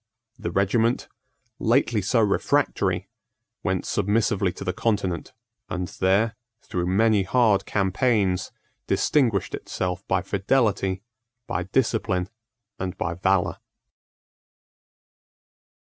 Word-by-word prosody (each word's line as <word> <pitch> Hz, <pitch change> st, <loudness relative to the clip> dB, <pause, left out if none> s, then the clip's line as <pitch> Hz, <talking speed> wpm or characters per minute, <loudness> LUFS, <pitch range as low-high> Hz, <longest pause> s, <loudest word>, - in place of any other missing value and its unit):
The 110 Hz, -, -3 dB
regiment, 110 Hz, +5 st, +1 dB, 0.5 s
lately 115 Hz, -2 st, +2 dB
so 115 Hz, +5 st, +2 dB
refractory, 105 Hz, -2 st, +1 dB, 0.5 s
went -, -, -1 dB
submissively 105 Hz, -2 st, +1 dB
to -, -, -8 dB
the 90 Hz, -, -1 dB
Continent, 100 Hz, -7 st, -1 dB, 0.4 s
and 90 Hz, -1 st, -3 dB
there, 100 Hz, +4 st, +1 dB, 0.3 s
through 90 Hz, -1 st, -2 dB
many 105 Hz, +2 st, +3 dB
hard 100 Hz, 0 st, +2 dB
campaigns, 95 Hz, -1 st, +1 dB, 0.4 s
distinguished 115 Hz, -11 st, +2 dB
itself 90 Hz, 0 st, -3 dB
by 90 Hz, -, +1 dB
fidelity, 100 Hz, -2 st, +1 dB, 0.4 s
by 90 Hz, -4 st, -2 dB
discipline, 100 Hz, -4 st, 0 dB, 0.5 s
and 95 Hz, 0 st, -4 dB
by 85 Hz, -, -2 dB
valour. 95 Hz, +1 st, +1 dB
100 Hz, 95 wpm, -25 LUFS, 95-110 Hz, 0.5 s, many